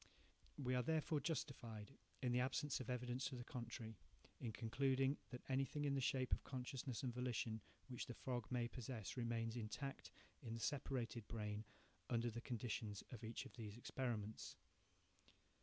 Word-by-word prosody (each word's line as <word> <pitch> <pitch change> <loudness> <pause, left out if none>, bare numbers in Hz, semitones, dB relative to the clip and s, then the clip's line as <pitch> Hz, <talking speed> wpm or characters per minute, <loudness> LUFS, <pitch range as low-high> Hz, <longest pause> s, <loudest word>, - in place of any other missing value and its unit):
We 130 -3 +2
are 125 - +5
therefore 155 +1 +3
justified, 120 -9 -1 0.3
in 125 - +4
the 120 - +5
absence 135 +2 +2
of 130 - -3
evidence 125 +1 +1
to 135 - 0
the 120 - -3
contrary, 115 -4 -4 0.4
in 115 - -1
concluding 135 +4 +3
that 125 - -5
anything 135 +2 +2
in 140 - +4
the 135 - +3
shape 130 -1 +3
of - - +3
consciousness 130 -1 -2
and 125 -2 +1
volition 120 -3 +1 0.3
which 125 -3 -2
the 120 - -4
frog 120 -3 -1
may 120 -2 +3
possess 120 -4 -3
remains 115 -2 +1
intact 120 +5 -2 0.3
in 115 -4 -2
the - - -3
separated 120 -3 0
brain, 105 -1 -1 0.4
under 120 0 +3
the 120 +2 -3
conditions 110 -4 -1
of 120 -3 -5
each 115 +1 -2
of - - -9
these 110 -3 -5
experiments. 115 -4 -1
125 Hz, 160 wpm, -46 LUFS, 115-130 Hz, 0.4 s, are